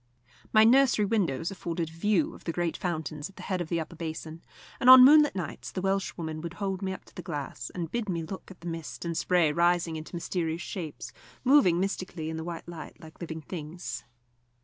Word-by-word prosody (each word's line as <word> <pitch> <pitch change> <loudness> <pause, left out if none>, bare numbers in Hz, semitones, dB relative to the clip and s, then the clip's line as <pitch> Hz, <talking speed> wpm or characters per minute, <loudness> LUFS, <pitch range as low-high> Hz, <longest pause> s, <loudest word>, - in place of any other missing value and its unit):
My 215 -1 +7
nursery 240 -2 +5
window 190 -11 0
afforded 170 -2 -3
a - - -15
view 210 - +1
of - - -14
the 165 - -1
great 170 0 -1
fountains 155 -3 -3
at 195 - -19
the - - -10
head 185 -2 -2
of 165 - -5
the 170 - 0
upper 160 +1 -6
basin, 160 0 -6 0.4
and 255 - +5
on 255 0 +12
moonlight 295 -1 +7
nights 180 -4 -5
the - - -4
Welshwoman 175 -5 -2
would 170 +1 -6
hold 195 -2 -3
me 190 -1 -2
up 190 - -8
to - - -19
the - - -7
glass, 145 -8 -5
and 170 -3 -4
bid 235 -3 -2
me 170 -3 -1
look 190 +4 -8
at 190 - -13
the 170 - -7
mist 165 0 -6
and 170 -1 -2
spray 175 -2 +3
rising 170 0 +2
into 155 +3 -8
mysterious 170 -1 -2
shapes, 165 -6 -6 0.3
moving 245 -11 +5
mystically 185 -4 -3
in 160 - -4
the 160 - -4
white 170 0 -6
light 165 -3 -9
like 160 +2 -14
living 160 -1 -5
things. 165 +2 -6
170 Hz, 215 wpm, -28 LUFS, 160-195 Hz, 0.4 s, on